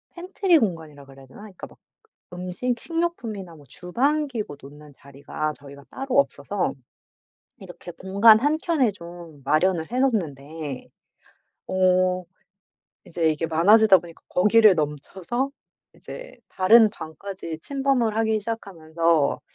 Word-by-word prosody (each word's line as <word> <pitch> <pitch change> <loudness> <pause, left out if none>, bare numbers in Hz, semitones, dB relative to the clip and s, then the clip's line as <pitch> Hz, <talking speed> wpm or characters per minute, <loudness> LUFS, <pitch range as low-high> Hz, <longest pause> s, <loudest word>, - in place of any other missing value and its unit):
펜트리 365 0 +1
공간이라 160 - -4
그래야 135 0 -15
되나? 135 +10 -15
그러니까 205 -4 -11
막 - - -20 0.6
음식 185 +7 -3
식료품이나 235 - -4
뭐 145 -2 -17
주방 275 - -1
기구 215 - -5
놓는 145 +2 -14
자리가 140 +2 -6
저희가 140 -1 -14
따로 270 0 -3
없어서 280 - -1 0.9
이렇게 180 -2 -11
공간 200 +5 +5
한켠에 295 - +1
좀 170 -5 -12
마련을 160 - +1
해 250 - -1
놓는데 155 - -3 0.8
어 185 0 +2 0.8
이제 165 -1 0
이게 155 +1 -2
많아지다 195 +5 +5
보니까 170 -1 -14
거기를 210 +2 +5
넘쳐서 170 - -3 0.4
이제 - - -11
다른 220 +4 +5
방까지 165 0 -8
침범을 270 - 0
하기 220 -1 +1
시작하면서 165 -8 -1
185 Hz, 285 characters per minute, -23 LUFS, 160-230 Hz, 0.9 s, 공간